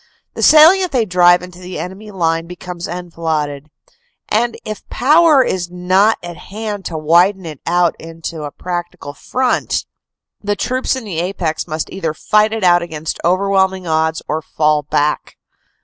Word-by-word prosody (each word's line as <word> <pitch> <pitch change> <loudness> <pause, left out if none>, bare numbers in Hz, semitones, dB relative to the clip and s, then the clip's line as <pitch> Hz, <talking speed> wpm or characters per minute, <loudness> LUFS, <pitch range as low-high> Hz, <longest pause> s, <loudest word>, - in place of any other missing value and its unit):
The - - -6
salient 345 +4 +6
they 245 -4 +1
drive 175 -1 +4
into 180 0 -11
the 185 0 -7
enemy 190 +4 -7
line 165 -4 -1
becomes 180 0 -7
enfiladed, 160 -4 -4 0.6
and 235 +2 0
if 215 -1 -7
power 300 +1 +5
is 175 -6 -2
not 185 +5 +2
at 175 -1 -7
hand 205 +1 -6
to 165 - -4
widen 175 +5 +3
it 155 -4 -8
out 175 0 +2
into 165 0 -7
a 145 - -4
practical 175 -4 -6
front, 255 - -1 0.6
the 205 0 0
troops 255 +4 -1
in 260 - -6
the 185 -7 -4
apex 170 -3 -2
must 155 -1 -4
either 165 -5 -3
fight 215 +4 +2
it 225 -2 -3
out 175 -1 +5
against 160 -2 -5
overwhelming 190 +1 +1
odds 160 0 0
or 155 +1 -2
fall 150 0 +1
back. 145 +1 -1
180 Hz, 155 wpm, -17 LUFS, 165-205 Hz, 0.6 s, salient